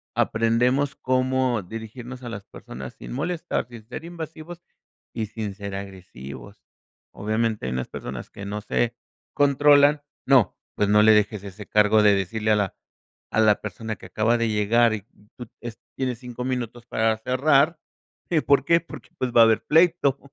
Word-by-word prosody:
aprendemos 125 +5 +1
cómo 130 -3 0
dirigirnos 115 +5 -8
a 120 - -6
las 100 -3 -7
personas 65 +1 -9
sin - - -10
molestar, 165 +1 -2
sin 120 -3 -12
ser 160 +6 -7
invasivos 170 0 -8 0.5
y 110 -2 -2
sin 105 -1 -5
ser 100 -1 -7
agresivos. 90 -10 -9 0.5
Obviamente 110 - -1
hay 65 - -3
unas 65 0 -3
personas 60 0 -7
que 100 - -9
no 105 +1 -4
se 120 +2 0 0.4
controlan, 145 +1 +5 0.2
no, 130 -9 +4 0.2
pues, 105 - +1
no 105 0 +5
le 110 0 +7
dejes 105 -1 +2
ese 100 +1 -9
cargo 105 0 +4
de 105 -1 +6
decirle 105 +3 -1
a 105 - +4
la 100 -2 -1 0.6
a 110 - +2
la 105 -2 +4
persona 110 +2 -5
que - - -12
acaba 115 +2 +1
de 115 -1 +1
llegar 110 +2 +3
y 105 - -5 0.3
tú, 120 - -8
es 120 -1 -8 0.2
tienes 125 -3 -2
5, 125 -1 -7
minutos 120 -2 -4
para 110 -1 +1
cerrar, 140 +6 +2 0.5
¿y 165 - +3
por 140 +1 +3
qué? 170 +2 +4
Porque, 165 - -12
pues, 125 -1 -2
va 115 -1 +7
a - - +9
haber 110 -1 +3
pleito. 160 -4 +3
115 Hz, 170 wpm, -24 LUFS, 105-130 Hz, 0.6 s, a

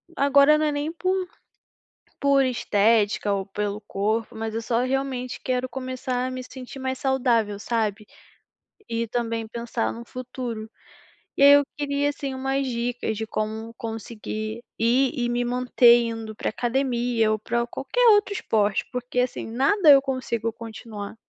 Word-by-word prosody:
agora 280 +2 +5
não 310 - +1
é 300 - +1
nem 290 +2 -2
por 370 +2 -1 0.9
por 280 -1 +4
estética 210 -3 +2
ou 195 -1 -2
pelo 205 +1 -3
corpo, 215 +3 -2
mas 220 0 -4
eu 225 - -2
só 230 +1 0
realmente 255 -1 -2
quero 255 0 -1
começar 255 -1 -3
a - - -4
me 255 - -5
sentir 255 +1 -10
mais 260 0 -2
saudável, 240 -6 +1
sabe, 215 -2 -1 0.8
e 230 0 -1
também 230 -1 -2
pensar 235 0 -2
num 235 - -9
futuro, 245 -3 -6 0.7
e - - +4
aí 280 - +10
eu 285 0 +6
queria 285 0 0
sim 275 -2 -5
umas 270 +1 -1
dicas 240 -3 -2
de 220 0 -4
como 220 +2 -4
conseguir 220 0 -5 0.2
ir 250 +4 +3
e 245 -4 -1
me 240 0 0
manter 245 -1 +5
indo 225 -1 -5
pra - - -2
academia 240 -2 0
ou 215 - +1
pra 235 +2 -1
qualquer 485 - +1
outro 415 -1 +3
esporte, 210 - 0
porque, 250 0 -2
assim, 250 0 -1
nada 300 - +3
eu 275 -1 +8
consigo 235 -4 -2
continuar. 220 -2 -8
240 Hz, 155 wpm, -24 LUFS, 225-265 Hz, 0.9 s, aí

